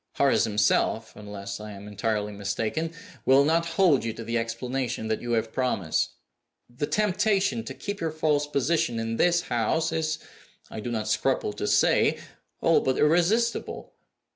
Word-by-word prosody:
Horace - - +3
himself 110 +1 +1
(unless 100 -1 -7
I 105 0 -8
am 100 +1 -10
entirely 105 0 -2
mistaken) 110 +11 -2 0.3
will 135 +2 +5
not 165 +2 +2
hold 175 -8 +4
you 115 -1 -2
to 115 - -7
the 115 +1 -3
explanation 120 0 -2
that 110 - -1
you 120 0 -2
have 110 -1 0
promised. 105 -11 0 0.5
The 125 +5 -4
temptation 195 - +1
to 135 - -6
keep 205 +8 -5
your 165 - -1
false 150 -2 +1
position 140 -3 0
in 115 0 -2
this 175 -1 +3
house 125 +4 0
is, 160 -1 -1 0.5
I - - -6
do 110 - -4
not 110 -2 -2
scruple 110 0 0
to 105 - -3
say, - - +3 0.4
all - - +4
but 130 - 0
irresistible. 175 +10 +1
125 Hz, 160 wpm, -26 LUFS, 110-160 Hz, 0.5 s, will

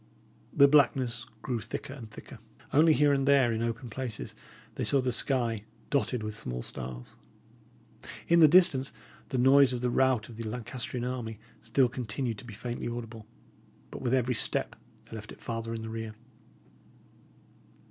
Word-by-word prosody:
The 140 - +6
blackness 130 -4 +3 0.2
grew 125 -3 -1
thicker 125 +4 -6
and 120 -6 -9
thicker. - - -11 0.3
Only 155 +2 +6
here 145 -1 +4
and 135 -1 +1
there, 135 -4 +5
in 110 - -2
open 115 +2 -3
places, 120 -2 -5 0.4
they - - -3
saw 140 - +4
the 130 -1 0
sky, 120 -4 0 0.3
dotted 130 -5 0
with 105 0 -4
small 60 - -5
stars. 60 -1 -7 1.1
In 170 0 +5
the 160 - +9
distance, 145 -5 +4 0.4
the 130 - -2
noise 135 +1 +6
of 120 - -3
the 125 -1 0
rout 130 -4 +2
of 115 - -12
the 115 - -4
Lancastrian 120 +1 -4
army 120 -3 -4 0.2
still 135 -2 +2
continued 120 -2 -3
to - - -12
be 115 -4 -9
faintly 120 +2 -5
audible; 115 -2 -6 0.6
but - - -7
with 130 0 +1
every 125 0 +1
step - - -1 0.3
they - - -10
left 105 -1 -8
it - - -12
farther 115 -1 -4
in 115 -1 -4
the - - -5
rear. 110 -1 -5
120 Hz, 170 wpm, -29 LUFS, 115-135 Hz, 1.1 s, the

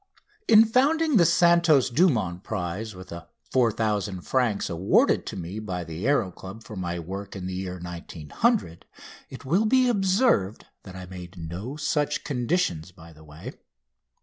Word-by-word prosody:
In 220 0 +7
founding 285 +5 +2
the 170 -4 +5
Santos 170 -7 +4
Dumont 110 - +1
prize 105 +1 -4
with 95 0 -11
the 85 0 -9 0.2
4000 105 -6 0
francs 120 -2 0
awarded 85 +2 +2
to - - -5
me 90 +3 -6
by 90 -5 -4
the 80 +4 -7
Aéro 120 -10 +1
Club 95 +4 -10
for 110 -1 -10
my 90 -2 -3
work 95 +4 -7
in 95 -2 -6
the 95 - -4
year 90 0 -5
1900 85 - -2 0.4
it - - -11
will 180 +11 +2
be 255 +3 +3
observed 195 - +1 0.2
that 95 -2 -12
I 95 -1 -8
made 90 0 -10
no 90 - -6
such 150 -1 -1
conditions 125 - -1
by 85 -1 -15
the 80 0 -17
way. 75 +1 -10
100 Hz, 155 wpm, -25 LUFS, -, 0.4 s, In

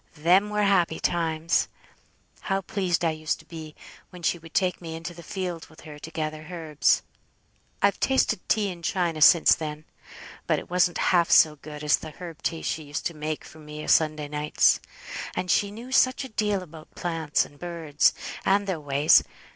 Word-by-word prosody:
Them 180 +7 +4
were 210 0 0
happy 180 -5 +2
times! 165 -1 0 0.7
How 195 -1 -1
pleased 185 -4 -1
I 165 - +3
used 155 -1 -2
to - - -17
be 160 -2 -9 0.3
when 180 -2 -12
she 175 - +1
would 165 0 -15
take 185 -2 +1
me 165 -1 -6
into 165 +2 -6
the 170 - -11
fields 175 -1 -5
with 155 - -16
her 150 -1 -11
to 160 - -8
gather 155 -1 -4
herbs! 160 -4 +1 0.8
I've 200 0 +3
tasted 265 -6 +2
tea 210 -2 +2
in 175 -2 -8
China 170 -2 -1
since 165 +1 +7
then, 155 -1 -5 0.6
but - - +2
it - - -8
wasn't 180 -1 +2 0.2
half 170 -2 +4
so 155 -1 +6
good 150 +1 -9
as 150 - +4
the 160 - -9
herb 165 +1 -10
tea 165 -1 -3
she 160 - -2
used 145 -1 -6
to 170 - -1
make 155 0 -4
for 160 - -14
me 150 0 -8
o' - - -6
Sunday 155 -2 +2
nights. 150 +1 +2 0.6
And 180 - -1
she 205 - +2
knew 230 +5 -10
such 260 0 +3
a 265 - -8
deal 210 -3 -1
about 160 -2 -14
plants 165 -3 0
and 145 - -17
birds, 165 -4 +1 0.3
and 200 +1 +2
their 190 -5 -2
ways! 145 +1 +4
165 Hz, 190 wpm, -26 LUFS, 155-185 Hz, 0.8 s, since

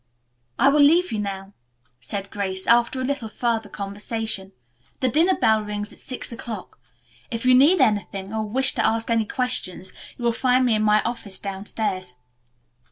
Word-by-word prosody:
"I 270 - +5
will 295 +2 +3
leave 335 +5 +5
you 215 - -2
now," 195 -1 -5 0.5
said 195 +11 -5
Grace, 190 -3 -2
after 235 +2 +3
a - - -2
little 260 -4 -2
further 225 -1 -1
conversation. 205 0 -4 0.5
"The 260 - +1
dinner 335 +8 +3
bell 220 -1 +3
rings 210 0 -5
at - - -16
six 255 -1 -5
o'clock. 225 - -8 0.5
If 230 +1 -4
you 255 - +6
need 295 +8 +6
anything, 205 -4 0
or 220 0 -1
wish 260 +5 +3
to 225 - 0
ask 225 +1 0
any 225 -1 +2
questions, 210 -7 -2 0.3
you 240 - -5
will 235 - +4
find 255 +2 +2
me 240 - +3
in 215 - +1
my 210 0 +3
office 225 -4 -5
downstairs. 195 - -4
220 Hz, 170 wpm, -23 LUFS, 200-250 Hz, 0.5 s, you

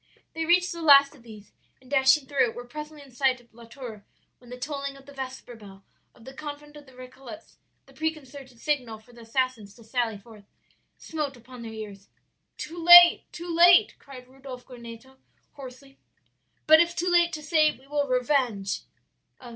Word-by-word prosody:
"They 325 0 -4
reached 360 +1 +3
the 335 - -7
last 280 -2 +6
of 280 - -19
these, 215 -3 -14 0.3
and 260 - -22
dashing 265 +1 +3
through 265 -3 +1
it, - - -11
were 245 - -8
presently 300 +3 -10
in 270 - -19
sight 255 0 +1
of 240 -1 -25
La 235 +1 -15
Tour, 230 -4 -10 0.4
when 245 - -18
the 250 - -9
tolling 280 +1 -6
of 275 - -18
the 285 - -14
vesper 260 -2 -8
bell 195 -3 -15 0.3
of 230 - -19
the 265 - -11
convent 295 +1 -9
of 295 -1 -14
the 260 - -18
Récollets 255 +4 -13 0.3
the 270 - -21
preconcerted 280 -4 -6
signal 250 -6 -2
for 220 +3 -21
the 235 - -15
assassins 230 -3 -3
to 235 - -17
sally 225 -1 -2
forth 210 0 -17 0.5
smote 295 -4 -5
upon 245 +1 -13
their 230 -1 -8
ears. 205 -3 -10 0.5
"'Too 335 +2 -7
late! 350 0 +9
too 345 0 -7
late!' 350 +1 +6
cried 255 -3 -13
Rudolph 260 -1 -11
Goneto 240 +1 -13 0.3
hoarsely. 270 0 -13 0.7
"'But 315 +1 +7
if 340 0 +1
too 355 +2 -1
late 345 -1 +3
to 305 - -6
save, 305 -1 +2
we 260 - -22
will 290 +1 -2
avenge!' 250 -6 -1
265 Hz, 185 wpm, -25 LUFS, 240-300 Hz, 0.7 s, late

